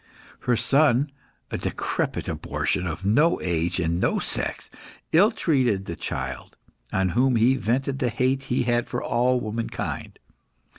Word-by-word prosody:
Her 120 - +5
son 135 +3 +3 0.4
a - - -2
decrepit - - -2
abortion, 90 - -1
of 85 +3 -5
no 145 +12 +3
age 85 +1 -1
and 85 0 0
no - - +1
sex - - -3 0.4
ill 190 +7 +6
treated 130 - +1
the 85 - -5
child, 65 -4 -5 0.3
on 95 -1 +1
whom 125 +6 +2
he 115 +3 +4
vented 135 +2 -1
the 125 - +1
hate 130 +3 0
he 125 -1 0
had 120 -1 +1
for - - -3
all 125 +1 +2
womankind. 115 +1 -4
120 Hz, 145 wpm, -25 LUFS, 95-130 Hz, 0.4 s, ill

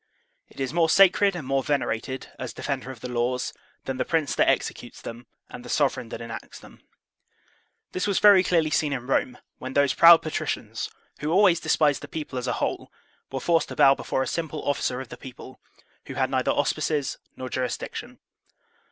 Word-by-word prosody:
It - - -17
is 135 +1 -2
more 165 -1 +3
sacred 195 +1 +5
and 165 -6 -5
more 135 +1 +1
venerated, 130 -2 -2
as 130 -1 -5
defender 135 -2 -4
of 130 -4 -9
the - - -5
laws, 125 +1 -1 0.3
than 135 -1 -3
the - - +1
Prince 160 -4 0
that - - +3
executes - - -2
them 120 +1 -9 0.2
and 120 - -10
the 125 - -10
sovereign 130 -4 0
that 115 - -7
enacts 115 -1 -8
them. - - -16 1.1
This 185 - -2
was 200 - +1
very 200 -3 +7
clearly 165 -4 +2
seen 150 -2 +1
in 125 -2 -4
Rome, 130 -1 0 0.2
when 130 +1 -6
those 140 -1 +3
proud 170 0 +8
patricians, 155 - -3 0.3
who 150 - -2
always 180 -1 +5
despised 150 -3 +2
the - - -8
people 150 -5 -5
as 125 - -5
a 120 - 0
whole, - - -3 0.4
were 135 - -3
forced 165 +4 +2
to - - -8
bow 135 - +6
before 130 - -2
a - - -4
simple 160 -2 -4
officer 130 -3 0
of 130 - -10
the - - -9
people, 130 0 -11 0.5
who - - -7
had - - 0
neither - - 0
auspices 150 -3 0 0.2
nor 130 - -6
jurisdiction. 125 -1 -4
135 Hz, 190 wpm, -25 LUFS, 130-160 Hz, 1.1 s, proud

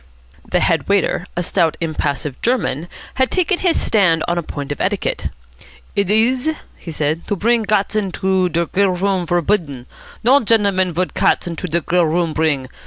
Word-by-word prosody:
The 180 - +1
head 165 -5 +1
waiter, 200 -2 +1
a 175 - 0
stout 165 -2 +1
impassive 150 -4 -3
German, 215 - 0 0.3
had 260 - +3
taken 365 0 +1
his 355 -3 +2
stand 180 -7 +2
on 175 - 0
a 175 - 0
point 145 -3 -6
of 145 - -4
etiquette. - - -1 0.7
"Id 200 -2 0
is," 245 +7 +2 0.3
he - - -11
said, 155 +1 -2
"to 205 - 0
bring 230 +4 +2
gats 210 -1 0
into 190 -2 0
der 170 +1 0
grill 195 +4 +1
room 185 -1 -1
vorbidden. 170 -7 0 0.4
No 260 +5 +6
gendleman 200 - +1
would 180 +1 -1
gats - - +2
into 175 +1 -4
der 170 +1 0
grill 175 +1 +2
room 165 0 0
bring. 150 -5 0
180 Hz, 175 wpm, -18 LUFS, 165-205 Hz, 0.7 s, No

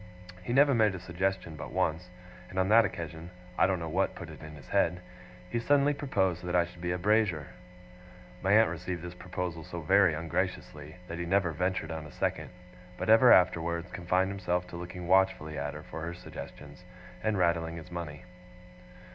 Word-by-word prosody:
He 90 - -5
never 140 +2 +5
made 110 -5 +3
a - - -6
suggestion 90 -1 -2
but - - -7
once; 85 +3 -1 0.4
and 95 - -9
on 95 +1 +2
that 115 +1 +7
occasion 85 -2 -6 0.3
(I - - +4
don't 95 -1 +1
know 85 -1 -5
what 95 +5 0
put 85 -3 -8
it 80 - -12
in 75 0 -9
his 70 -4 -14
head), 90 +1 +2 0.5
he 120 +6 -2
suddenly 145 +4 +3
proposed 95 - 0
that 90 0 -2
I 85 -1 +4
should 85 0 -14
be 85 0 -1
'a 90 - 0
Brazier'. 95 -6 +1 0.9
My 95 - +1
aunt 110 +1 +6
received 90 -3 -5
this 90 0 -6
proposal 90 -2 -5
so 85 +2 -7
very 95 0 +4
ungraciously, 80 -2 -3
that 85 0 -6
he 85 - -2
never 95 -1 +2
ventured 90 0 -1
on 80 -2 -5
a - - -13
second; - - -2 0.5
but - - -3
ever 120 +2 +8
afterwards 85 -1 +3
confined 90 +1 0
himself 90 -2 -1
to - - -9
looking 85 0 -7
watchfully 95 -4 +2
at 70 0 -3
her - - -8
for 80 - -8
her 85 +2 -4
suggestions, 75 -2 -10 0.4
and 110 0 0
rattling 85 -2 +1
his 85 +2 -10
money. 85 -4 -6
90 Hz, 190 wpm, -30 LUFS, 85-95 Hz, 0.9 s, ever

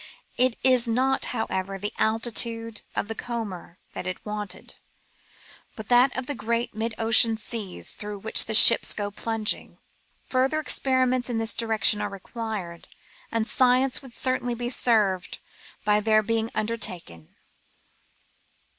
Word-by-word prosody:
It 255 -1 +1
is 255 -2 +4
not, 260 +4 +1
however, 195 -4 -3
the 205 +2 -5
altitude 225 0 -1
of - - -2
the 225 - -3
comber 215 -8 -7 0.2
that - - -6
is 185 - -3
wanted, 210 -3 -6 1.0
but 220 -1 -9
that 250 +2 +4
of 255 - -3
the 290 - -3
great 235 0 -3
mid 220 +1 -4
ocean 225 0 +6
seas 215 -4 -4
through 210 0 -7
which 220 +3 +1
the 220 - -1
ships 230 +2 +8
go 205 -1 -4
plunging. 225 +1 -2 0.5
Further 265 +4 +1
experiments 255 -4 +1
in 235 - -2
this 225 0 +1
direction 220 -2 +1
are 205 - -3
required, 200 -3 -7 0.4
and 230 -1 -1
science 255 +2 +2
would 265 -3 -13
certainly 255 -2 -1
be 240 +1 -4
served 205 -8 +1 0.5
by 210 0 +3
their 215 0 +2
being 225 +1 -1
under 220 +2 -2
taken. 90 - -7
225 Hz, 140 wpm, -25 LUFS, 210-245 Hz, 1.0 s, ships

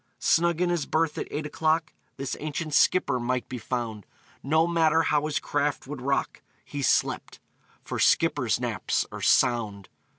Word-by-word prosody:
Snug 170 0 +2
in 180 -1 +2
his 170 -4 -1
berth, 160 -1 0
at - - -4
eight 150 +1 -4
o'clock, 155 +1 0 0.2
This 135 -1 -3
ancient 155 +1 -4
skipper 140 -5 +3
might 125 -1 -2
be 125 - -6
found; 110 -3 -4 0.3
No 160 +4 +2
matter 165 -1 +3
how 150 -1 +1
his 155 - -1
craft 145 0 -1
would 135 -1 -7
rock, 140 +1 -1 0.2
He 145 - -5
slept - - 0 0.4
for - - -5
skippers' - - +2
naps - - -1
are - - -7
sound! 105 -5 +2
145 Hz, 160 wpm, -26 LUFS, 125-160 Hz, 0.4 s, skipper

